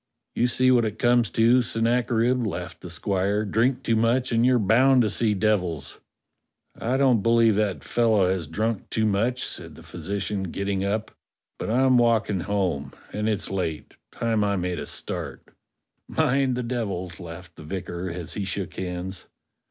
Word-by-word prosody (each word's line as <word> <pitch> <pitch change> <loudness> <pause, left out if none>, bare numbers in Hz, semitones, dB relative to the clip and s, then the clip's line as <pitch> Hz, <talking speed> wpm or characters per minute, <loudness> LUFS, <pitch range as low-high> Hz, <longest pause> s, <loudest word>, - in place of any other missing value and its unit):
"You 120 - +2
see 130 +1 +3
what 120 -2 +4
it 110 -1 -3
comes 120 -3 +3
to, 120 +3 +4
Sennacherib," 120 +1 +1
laughed 90 -3 -6
the 90 - -8
squire: 100 +4 0
"drink 120 +5 +1
too 115 - +1
much 120 +3 +1
and 115 0 +2
you're 125 0 +4
bound 120 +5 +4
to 105 - 0
see 105 +1 +2
devils!" 90 -9 -1 0.8
"I 125 +3 -1
don't 130 -5 +3
believe 115 0 +4
that 105 -3 -1
fellow 110 -5 +2
has 90 -4 -1
drunk 110 +6 -2
too 110 - 0
much," 115 +5 0
said - - -6
the - - -13
physician, 100 0 -4
getting 100 +1 -2
up. 105 +2 -2 0.2
" - - -59
But - - -4
I'm 130 +2 +4
walking 115 -4 +2
home, 90 -7 -2 0.2
and 105 +1 -1
it's 105 -3 -1
late; 85 -5 -3 0.2
time 115 -2 0
I 100 -1 +1
made 90 -2 -2
a - - -6
start." - - -4 0.6
"Mind 135 0 +1
the 125 - -2
devils!" 100 -8 -4
laughed 85 0 -10
the - - -11
vicar 90 +1 -5
as 85 -1 -6
he 105 - -3
shook 95 0 -4
hands. 90 0 -5
105 Hz, 170 wpm, -25 LUFS, 95-120 Hz, 0.8 s, what